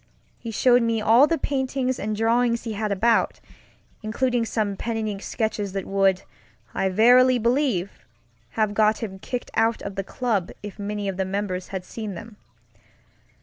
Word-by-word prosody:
He 230 - -7
showed 245 +3 +4
me 230 -1 +1
all 230 +6 +5
the 330 - +1
paintings 265 -2 -1
and 215 0 -2
drawings 235 +2 +1
he 225 -2 -4
had 215 0 -2
about; 225 +4 +2 0.6
including 235 +2 0
some 210 -3 -1
pen 230 +3 -3
and 220 -1 -2
ink 200 -2 -4
sketches 210 -4 -2
that 195 -2 -3
would, 195 -1 +2 0.5
I 190 - 0
verily 250 +6 +5
believe, 235 -5 +1 0.7
have 215 -2 +1
got 215 +2 +2
him 190 -3 -6
kicked 250 +5 -5
out 225 +1 +1
of 200 - -5
the 195 0 -3
club 210 -4 -1
if, 205 0 -8
many 205 0 -3
of 195 -2 -3
the 190 - 0
members 190 -1 -3
had 190 -2 -6
seen 215 -2 -6
them. 225 +2 -10
220 Hz, 170 wpm, -24 LUFS, 200-235 Hz, 0.7 s, all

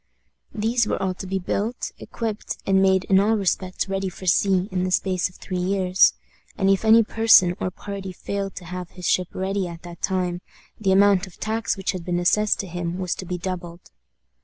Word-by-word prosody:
These 225 +1 +1
were - - -1
all 190 -1 -1
to 190 +1 -8
be 190 +1 -1
built, 205 +5 -2
equipped, 225 -3 -4
and 190 0 +3
made 190 -1 +3
in 190 0 +4
all 215 +3 +3
respects 185 -1 -1
ready 195 0 -2
for 185 - -11
sea 190 +1 +3
in 180 -1 -1
the 185 - 0
space 185 0 +1
of 180 - -21
three 185 -1 -5
years; 185 0 +3 0.4
and 195 -1 +3
if 195 - +1
any 225 +1 +6
person 215 -5 +5
or - - -1
party 195 0 -7
failed 195 +1 -4
to 180 - -8
have 180 0 -6
his 180 -1 -10
ship 180 -1 +2
ready 190 0 -1
at 170 0 -9
that 175 -1 -10
time, 180 -2 -1 0.4
the 195 -3 +1
amount 195 0 +4
of 185 - -14
the - - -29
tax 220 -2 -1
which 195 +1 -1
had 185 -3 -6
been 175 0 -1
assessed 210 +4 +2
to 195 - -8
him 175 0 -4
was 185 -2 -1
to 185 - -7
be 180 - -3
doubled. 175 -1 -6
190 Hz, 210 wpm, -23 LUFS, 180-200 Hz, 0.4 s, any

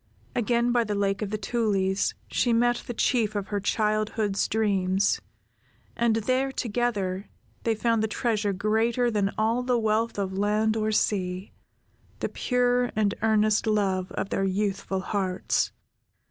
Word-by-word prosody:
Again 240 +1 +2
by 240 -1 +3
the 210 -2 -2
Lake 200 0 0
of 210 - -2
the 215 - -2
Tulies, 200 -3 0 0.2
she 240 - +2
met 240 +1 +2
the 240 - -3
Chief 220 -3 +1
of 200 -1 -3
her 205 -1 -1
childhood's 215 -1 0
dreams, 195 -3 +1 0.7
and 235 -1 +2
there 255 +5 +1
together, 210 -6 -2 0.4
they 225 -1 +2
found 230 0 +1
the 220 - +1
treasure 215 -2 0
greater 225 +5 +1
than 205 -2 +1
all 225 +3 +1
the 250 -1 +1
wealth 220 0 0
of 195 -2 -2
land 215 +2 +2
or 215 -1 0
sea, 185 -3 0 0.7
the - - -2
pure 245 -1 +1
and 210 -2 +2
earnest 215 0 +2
love 195 -3 +1
of 195 - -3
their 195 - 0
youthful 195 0 -1
hearts. 190 -2 -1
215 Hz, 145 wpm, -26 LUFS, 200-230 Hz, 0.7 s, by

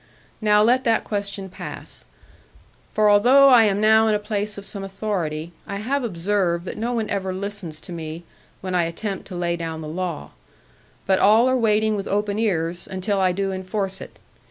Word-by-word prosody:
Now 210 -1 +4
let 250 +4 +3
that 225 -1 +2
question 200 -2 -4
pass. 185 - -9 0.9
For 215 0 +3
although 250 +7 +6
I 240 -4 +7
am 200 -1 +1
now 220 +1 +5
in 215 - +3
a - - +3
place 210 0 -3
of 200 - -8
some 200 -1 -7
authority, 180 -5 -3 0.2
I 200 - -4
have 255 +7 -1
observed 180 -3 -1
that - - -5
no 235 +2 -1
one 225 -3 -1
ever 190 -2 -1
listens 190 -4 -5
to - - -11
me, 165 0 -6 0.4
when 185 -1 -4
I 175 -2 +2
attempt 190 +4 -5
to 185 - -8
lay 175 -1 -1
down 165 -1 -5
the 155 - -6
law; 170 - -4 0.7
but 190 -1 +3
all 220 +5 +5
are 260 - +2
waiting 220 -2 +2
with 200 -1 -4
open 205 +1 -1
ears 175 -5 -1
until 195 +1 -1
I 185 -1 +3
do 195 +1 -2
enforce 190 +1 -3
it. - - -11
200 Hz, 190 wpm, -22 LUFS, 180-215 Hz, 0.9 s, I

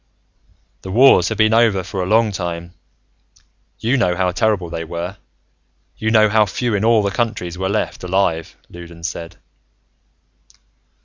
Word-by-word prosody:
"The 95 - -9
wars 110 -4 +5
have 110 - -4
been 110 0 +3
over 110 -5 +3
for 95 - -5
a 90 - -2
long 110 +1 +3
time. 85 -2 -5 1.0
You 125 +5 0
know 90 -7 +1
how 90 0 0
terrible 100 -2 0
they 85 -1 -4
were. 85 +3 -6 0.8
You 110 - -2
know 110 -1 +5
how 105 0 +3
few 120 +4 -2
in 100 0 0
all 115 -1 +4
the 100 - -1
countries 90 -5 -3
were 95 +1 -3
left 105 -2 -2
alive," 90 -3 -1
Loudons 85 -1 -8
said. 85 0 -8
95 Hz, 150 wpm, -19 LUFS, 85-110 Hz, 1.0 s, wars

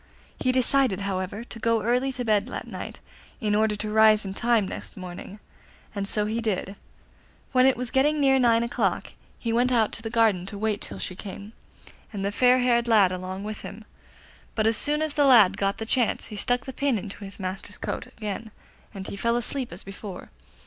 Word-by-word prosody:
He 255 - +2
decided, 255 -4 +2
however, 195 +2 -3
to 235 -1 -9
go 230 -1 +1
early 250 +4 +1
to 250 -1 -4
bed 215 0 +2
that - - -6
night, - - -7 0.4
in 215 -5 0
order 215 0 +2
to 210 +1 -4
rise 215 -1 +5
in 190 - -4
time 235 -2 +2
nest - - -7
morning, 185 +2 -8 0.5
and 200 -1 -2
so 210 +1 +2
he 220 +2 -2
did. 200 -2 -2 0.8
When 255 0 +5
it 265 - +3
was 250 -1 -3
getting 295 +3 +3
near 270 -2 +4
nine 235 -2 +4
o'clock 235 +1 -1 0.2
he 230 -1 -2
went 245 +2 +2
out 225 -4 +3
to - - -4
the 225 - -4
garden 220 -6 +2
to 205 - -3
wait 215 0 -1
till 100 - -2
she 95 - -3
came, 200 +2 -8 0.6
and 200 -2 -4
the 200 - 0
fair 250 +3 +4
haired 240 -1 +2
lad 210 -5 +5
along 185 +1 -5
with 215 0 -6
him; 215 +2 -9 0.7
but 215 - +1
as 225 0 +3
soon 300 +6 +1
as 310 -2 -2
the 290 -1 +3
lad 220 -8 +7
got 195 -1 -1
the 225 - -4
chance 235 -1 0
he - - -5
stuck 245 +3 -1
the 265 - -6
pin 275 -2 +1
into 205 0 -7
his 195 +1 -9
master's 190 +2 -5
coat 250 - -4
again 220 -2 -6 0.5
and 190 -1 -6
he - - -6
fell 235 +4 +1
asleep 250 +2 -2
as 175 - -7
before. 195 -1 -9
220 Hz, 210 wpm, -26 LUFS, 200-245 Hz, 0.8 s, lad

